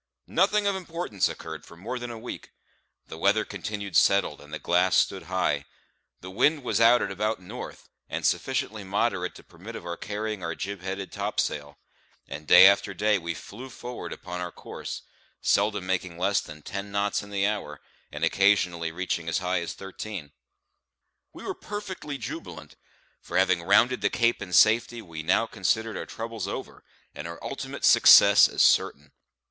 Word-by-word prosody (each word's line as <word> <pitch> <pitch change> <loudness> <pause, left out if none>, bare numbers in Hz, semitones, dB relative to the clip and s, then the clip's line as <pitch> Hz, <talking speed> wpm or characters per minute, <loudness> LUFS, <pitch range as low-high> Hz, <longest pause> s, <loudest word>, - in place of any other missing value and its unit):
Nothing 210 -1 +2
of 200 -1 +1
importance 170 - -2
occurred - - -8
for 85 - -15
more 115 +8 -5
than 120 0 -6
a 115 - -7
week. 115 +2 -8 0.6
The 80 - -10
weather 105 +4 +3
continued 100 0 -6
settled, 100 -6 +3
and 75 0 -15
the - - -3
glass 90 +1 +2
stood 95 - +2
high; 75 -6 0 0.6
the 95 - -9
wind 145 +8 +2
was 120 - 0
out 120 +2 +6
at 100 - -3
about 105 +2 -1
north, 90 - -9 0.2
and - - -3
sufficiently 105 0 -1
moderate 95 -2 -1
to - - -13
permit - - -11
of - - -8
our 85 0 -4
carrying 105 0 -4
our 85 -1 -3
jib 100 -1 -5
headed 95 +1 -5
topsail; 75 -8 -3 0.5
and 75 +2 -8
day 90 - +9
after 100 0 +4
day 105 +2 +2
we 85 -1 -4
flew 120 +11 -10
forward 125 0 -7
upon 90 -2 -6
our 90 -1 -4
course, - - -8 0.4
seldom 105 -1 +1
making 90 -2 -2
less 95 +3 +1
than 75 -1 -11
ten 100 0 -6
knots 100 0 0
in 100 - -11
the 100 -1 0
hour, 100 -9 -3 0.3
and - - -6
occasionally 90 -4 +2
reaching 85 -1 -3
as 85 - +1
high 90 -1 0
as 85 - -5
thirteen. 95 -5 -7 1.0
We - - -12
were - - -3
perfectly 190 -8 -6
jubilant; - - -8 0.5
for 85 - -4
having 95 -2 +3
rounded 100 +8 +3
the - - +2
Cape 120 -1 +1
in 90 - -7
safety 115 +5 +4
we 80 -4 -7
now 90 +8 +2
considered 110 +2 -1
our - - -5
troubles 115 -3 -5
over - - -7 0.3
and 75 - -7
our 85 0 -7
ultimate - - -4
success - - +8
as - - +2
certain. - - +2
100 Hz, 175 wpm, -26 LUFS, 90-110 Hz, 1.0 s, day